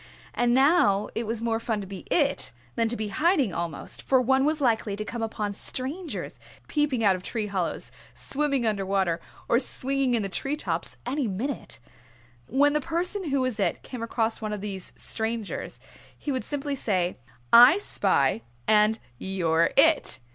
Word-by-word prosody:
And 240 0 +1
now 265 - +4
it 230 -1 -3
was 225 0 -3
more 225 -1 0
fun 225 -2 -2
to - - -6
be 190 0 -9
"It" 290 -5 +2 0.2
than 230 - +1
to 240 - -1
be 215 -1 -3
hiding 305 - +2
almost, 170 -3 -4
for 265 - +3
one 265 +2 +3
was 310 +1 +1
likely 225 -6 +1
to 215 +1 -5
come 235 +2 -5
upon 215 -2 -3
strangers 285 - -2 0.3
peeping 290 -6 0
out 195 -3 +5
of 185 - -7
tree 220 +3 -3
hollows, 190 -4 -2 0.2
swimming 275 -3 -1
under 210 -3 0
water, 190 -3 0 0.3
or 235 - +4
swinging 270 -1 +1
in 225 - 0
the - - -1
tree 275 +9 -2
tops, 165 - -4
any 280 -3 -1
minute. 225 +7 -4 0.7
When 285 +3 +3
the 300 - +1
person 345 +3 -1
who 275 -1 +1
was 255 -4 -2
"It" 185 -4 0
came 250 -3 -7
across 230 -1 -1
one 215 -1 -3
of 210 - -5
these 195 -3 -5
strangers 225 -2 -2 0.4
he 290 - -4
would 260 -4 -2
simply 285 +2 -3
say, 185 -8 -1 0.4
"I 245 +8 +9
spy, 135 - +1 0.3
and 215 +1 +4 0.2
you're 170 -3 +1
It." 320 +2 +5
230 Hz, 175 wpm, -26 LUFS, 200-275 Hz, 0.7 s, I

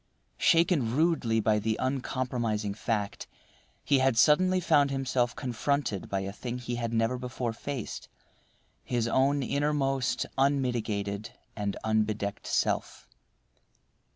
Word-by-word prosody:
Shaken 165 -9 +3
rudely 145 -8 +2
by 105 0 +2
the 110 +1 -1
uncompromising 125 -5 -1
fact, 105 -1 -3 0.6
he 140 - +4
had 130 -3 +2
suddenly 185 +8 +5
found 150 -5 +3
himself 130 -3 0
confronted 125 -4 -2
by 95 -1 -1
a 95 +1 -4
thing 120 +3 -5
he 120 -1 -4
had 115 -1 -2
never 115 +2 +1
before 125 -2 -3
faced—his 120 -1 -6
own 135 +3 +2
innermost, 135 -1 0
unmitigated, 115 -7 0 0.3
arid 100 -2 -2
unbedecked 110 -2 -1
self. - - -1
125 Hz, 110 wpm, -29 LUFS, 110-140 Hz, 0.6 s, suddenly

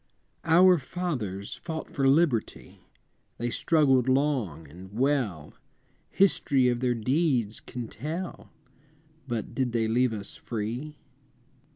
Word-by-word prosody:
I. 165 - +1
Our 180 0 +7
fathers 125 - -4
fought 160 -2 -5
for 135 -1 +1
Liberty, 135 -5 +1 0.6
They 120 +1 -2
struggled 135 -4 +3
long 130 - 0
and 90 +6 -12
well, 115 - -1 0.6
History 140 -9 +3
of 120 -1 0
their 125 -1 +1
deeds 125 -2 0
can 120 -3 -7
tell 160 - -6 0.8
But 115 -4 -4
did 130 -3 -1
they 115 -2 +1
leave 125 +2 +2
us 105 -2 -6
free? 120 +7 -5
125 Hz, 115 wpm, -27 LUFS, 110-150 Hz, 0.8 s, Our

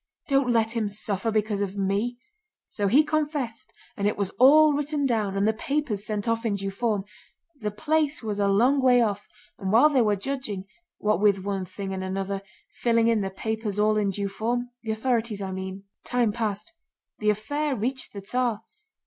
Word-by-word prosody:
Don't 275 -3 +2
let 225 -1 +2
him 220 -3 0
suffer 205 +1 -2
because 215 -2 0
of 200 0 -3
me.' 200 +5 0 0.5
So 205 -2 -2
he 270 +10 +5
confessed 295 -7 -2 0.2
and 200 0 0
it 210 - 0
was 200 -2 -1
all 300 +4 +7
written 290 0 -1
down 215 -6 0
and 200 +1 +2
the 220 - +3
papers 250 -3 -2
sent 210 -1 -2
off 230 0 0
in 220 -3 0
due 195 0 -3
form. 210 -1 -1 0.6
The 210 - -2
place 300 +5 0
was 210 -2 -3
a 200 - +3
long 245 +8 +4
way 250 -1 +5
off, 205 -3 0 0.3
and 190 -3 -2
while 240 +8 +6
they 270 -4 +3
were 210 -2 +3
judging, 210 -3 -4 0.3
what 210 -1 +1
with 200 -2 +3
one 195 -2 -2
thing 190 +1 -6
and 190 0 -3
another, 195 +1 -3 0.4
filling 230 -1 +3
in 225 -2 +2
the 195 - -2
papers 220 +1 -3
all 215 +1 +3
in 210 -2 +1
due 200 +1 -2
form—the 240 +3 -3
authorities 225 -1 0
I 195 -1 -4
mean—time 195 +5 -3
passed. 215 +5 -3 0.5
The 210 - +2
affair 285 +8 -1
reached 255 +4 -2
the 200 - -7
Tsar. 235 +1 -1
215 Hz, 185 wpm, -26 LUFS, 200-245 Hz, 0.6 s, all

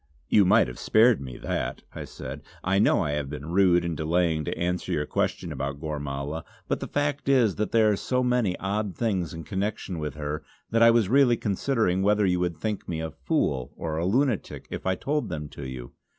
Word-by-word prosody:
"You 100 - +5
might - - +5
have 60 - -8
spared 110 - +4
me 65 -3 -7
that!" - - -3
I - - -6
said 65 +2 -8 0.2
"I 95 +1 +2
know 105 - +4
I 75 - -1
have 75 -2 -2
been 75 0 -6
rude 90 -2 +4
in 85 - -1
delaying 80 0 +1
to - - -3
answer 90 +1 -1
your 75 - 0
question - - -1
about 70 +1 -4
Gormala; 75 0 -4 0.2
but - - 0
the - - -5
fact 145 -1 -1
is 120 -8 +4
that 105 - -1
there 110 -2 +4
are - - +2
so 125 +5 0
many 125 -7 +1
odd 100 0 -2
things 95 -9 0
in 80 0 -7
connection 95 -2 -3
with 75 -2 -4
her 75 +1 -4 0.3
that 115 0 +2
I 115 - +8
was 115 -3 +4
really 125 0 +4
considering 105 -3 0
whether 105 +1 +3
you 90 -1 +2
would 90 -2 -1
think 105 -2 -3
me 80 -2 -2
a 80 0 -4
fool 65 -3 -1
or 80 -1 -3
a 85 - 0
lunatic 125 +1 0
if - - -5
I 95 - +2
told 145 +7 -2
them 75 -3 -4
to 70 -2 -8
you. 65 -2 -7
90 Hz, 215 wpm, -26 LUFS, 75-110 Hz, 0.3 s, I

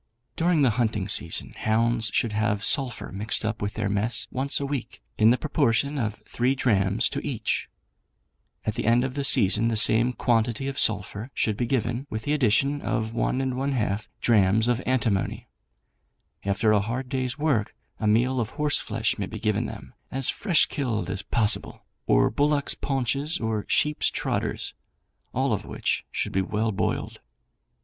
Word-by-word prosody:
During 165 -3 +2
the 130 - +4
hunting 110 -4 0
season 85 -5 -2
hounds 115 0 +1
should 115 - 0
have 105 -1 0
sulphur 135 -5 +1
mixed 105 +3 -2
up 110 +1 -2
with 100 0 -3
their 110 -2 -1
mess 105 +4 -1
once 135 +2 0
a 140 - -2
week, 140 -3 -5 0.2
in 110 +1 +6
the 125 - +4
proportion 140 +5 0
of 110 -2 -3
3 125 +3 0
drachms 105 -3 +2
to 140 - -3
each. 120 -7 -2 1.0
At 110 - 0
the - - -4
end 120 +2 +4
of 130 -1 -3
the 140 0 -2
season 110 -4 +4
the 115 - 0
same 115 +3 +5
quantity 120 +2 0
of 140 0 -3
sulphur 105 +2 0
should 110 - 0
be 120 +2 -2
given, 125 +1 -1
with 110 0 -4
the 145 - 0
addition 140 +2 +2
of 110 -2 -2
1½ 125 -4 -1
drachms 110 0 +3
of 120 0 +1
antimony. 115 -7 0 1.0
After 105 +2 +2
a 105 -1 +4
hard 120 +5 -3
day's 130 0 -2
work 145 -9 0 0.2
a 110 - -1
meal 120 +4 +2
of 110 -2 -1
horse 150 -1 +1
flesh - - -2
may - - -2
be - - -7
given - - 0
them, - - -10 0.2
as 135 -1 +2
fresh 185 -6 +2
killed 110 - -2
as 95 0 -2
possible, 110 -3 +1 0.2
or - - +4
bullocks' 145 0 +2
paunches 140 +4 -1
or 110 -2 -2
sheeps' 150 0 +2
trotters, - - -2 0.6
all - - 0
of - - -2
which - - -2
should - - -2
be 95 - +2
well 110 +3 -1
boiled. 100 - -2
115 Hz, 170 wpm, -25 LUFS, 110-135 Hz, 1.0 s, in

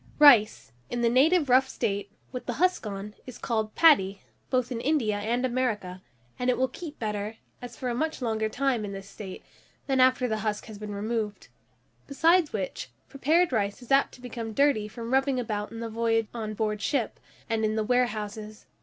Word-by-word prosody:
RICE, 240 - +6 0.2
in 240 - -2
the 235 - +3
native 300 +5 +4
rough 260 +1 +4
state, 200 -1 -2 0.2
with 250 -1 -6
the 245 - -1
husk 360 -4 +1
on, 200 +1 -6
is 255 - -8
called 220 -2 -2
paddy, 200 -12 +5 0.3
both 255 -1 0
in 230 -2 -3
India 240 -8 +1
and 235 +5 0
America, 220 -8 -2 0.4
and 250 0 0
it 250 - +2
will 260 - +2
keep 305 +4 -9
better, 210 0 -3 0.3
and 245 - -6
for 245 +2 -6
a 245 - 0
much 315 +6 -2
longer 220 -3 -1
time, 255 -1 0
in 200 -1 -5
this 195 0 -8
state, 195 -2 -9 0.4
than 270 -1 +1
after 255 0 +4
the 220 -2 -1
husk 210 0 -2
has 215 -3 -10
been 210 -1 -6
removed; 210 - -3 0.6
besides 330 +3 +3
which, 190 -10 -4 0.2
prepared 315 +5 +2
rice 200 -3 0
is 245 - -12
apt 275 +1 +4
to 250 - -17
become 230 -2 -6
dirty 275 -5 +2
from 230 +3 -6
rubbing 270 -1 +2
about 210 -3 -3
in 230 0 -7
the 230 - -3
voyage 225 0 +1
on 215 -2 -4
board 210 -1 -1
ship, 260 -5 -1 0.3
and 225 -1 -1
in 215 0 +1
the 220 - 0
warehouses. 215 -3 -2
230 Hz, 195 wpm, -27 LUFS, 210-260 Hz, 0.6 s, RICE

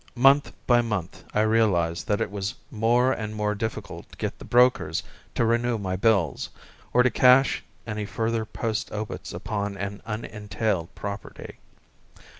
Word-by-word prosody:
Month 135 +3 +5
by 120 -1 +5
month 105 -7 -4
I 105 - +2
realized 100 -7 +2
that 105 - +1
it - - -1
was 100 -1 -3 0.2
more 120 +3 +3
and 110 -3 -3
more 105 -1 0
difficult 110 +1 -5
to - - -14
get - - -4
the - - -9
brokers 125 -9 +3 0.3
to 115 - +2
renew 120 +1 +2
my 95 -3 -2
bills, 95 - +1 0.4
or 125 - +5
to 125 - +3
cash 130 +1 +5 0.2
any 105 -2 -4
further 115 +1 -1
post 110 0 -3
obits 110 0 -5
upon 100 -1 -3
an 100 +1 -5
unentailed 105 -4 -3
property. 100 0 -7
110 Hz, 150 wpm, -26 LUFS, 100-115 Hz, 0.4 s, Month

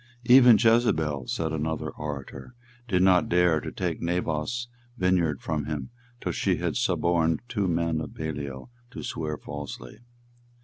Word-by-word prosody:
"Even 125 -2 +8
Jezebel," 80 - +2
said 80 -1 -2
another 80 0 -2
orator, 75 - -7 0.3
"did 90 -5 +2
not 90 -2 +4
dare 90 -2 +3
to - - -6
take - - -3
Naboth's 85 +7 -2 0.3
vineyard 90 - +1
from 75 -3 -2
him 75 - -4 0.3
till - - -2
she - - +1
had - - -2
suborned 85 -2 +1
two 105 -6 -1
men 85 -2 0
of 80 - -7
Belial 70 - -5 0.2
to - - -8
swear 75 -2 -3
falsely." 75 - -8
80 Hz, 140 wpm, -26 LUFS, 75-95 Hz, 0.3 s, Even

